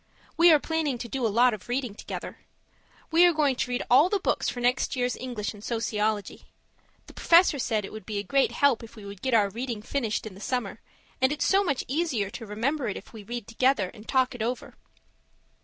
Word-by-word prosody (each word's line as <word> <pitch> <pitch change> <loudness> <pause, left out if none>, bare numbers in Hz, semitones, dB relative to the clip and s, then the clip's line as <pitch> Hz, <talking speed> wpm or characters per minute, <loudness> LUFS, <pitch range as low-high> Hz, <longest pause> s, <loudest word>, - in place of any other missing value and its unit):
We 340 0 +7
are 310 - +7
planning 315 -4 -1
to 235 - -6
do 250 -1 -1
a - - 0
lot 240 +3 +4
of 215 +2 -9
reading 250 -3 -2
together. - - -7 0.7
We 330 +2 +6
are 350 - +3
going 295 -4 +2
to 255 - -1
read 245 0 -1
all 265 +5 +6
of 365 - -2
the 410 - +2
books - - 0
for 245 - -5
next 245 +3 +1
year's 250 -1 0
English 240 -5 -4
and 205 0 -13
sociology. 215 -3 -2 0.6
The - - -14
Professor 335 -4 +4
said 215 -4 -1
it - - -10
would 215 -3 -9
be 215 -2 -3
a 200 - -2
great 275 +6 +2
help 280 -5 +3
if 230 0 -12
we 215 -3 -11
would 200 -1 -9
get 260 -3 +1
our 205 -3 +4
reading 235 -1 -4
finished 225 -4 -2
in 215 - -7
the 195 - -13
summer; 225 -2 -3 0.4
and 260 +1 +4
it's 300 - -1
so 390 +1 +4
much 280 -9 -1
easier 260 - -1
to 225 - -8
remember 245 +6 -1
it 205 - -3
if - - -12
we 220 - -9
read 235 +2 -6
together 230 -4 +1
and 220 -1 -14
talk 260 -1 +2
it 245 - -7
over. 240 +3 -3
245 Hz, 230 wpm, -27 LUFS, 215-275 Hz, 0.7 s, We